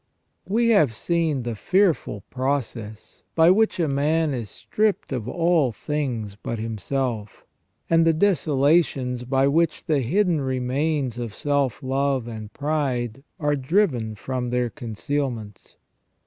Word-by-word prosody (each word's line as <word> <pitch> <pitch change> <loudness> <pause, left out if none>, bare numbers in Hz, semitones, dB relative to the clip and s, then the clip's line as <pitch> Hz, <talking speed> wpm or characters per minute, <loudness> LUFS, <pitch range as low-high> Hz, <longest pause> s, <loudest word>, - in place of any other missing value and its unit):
We 230 +3 +2
have 155 - +4
seen 160 -3 0
the 120 0 -3
fearful 175 - +1
process 125 -5 -3
by 165 +1 +6
which 220 0 +2
a 165 - +2
man 150 +2 +1
is 115 -5 -4
stripped 210 -6 -1
of 120 -4 -3
all 165 -5 +2
things 120 -6 -3
but 115 +2 -5
himself, 110 0 -3 0.4
and 165 0 +4
the 165 - +5
desolations 145 -7 +2
by 135 +2 +2
which 160 +2 +1
the 150 -3 +2
hidden 170 - +1
remains 130 0 -1
of 115 -3 -5
self 140 -5 0
love 135 -1 0
and 110 -2 -7
pride 135 -5 -2 0.2
are 145 -1 +1
driven 135 - +1
from 125 +4 -3
their 125 -1 0
concealments. 120 -3 -4
135 Hz, 130 wpm, -24 LUFS, 120-160 Hz, 0.4 s, by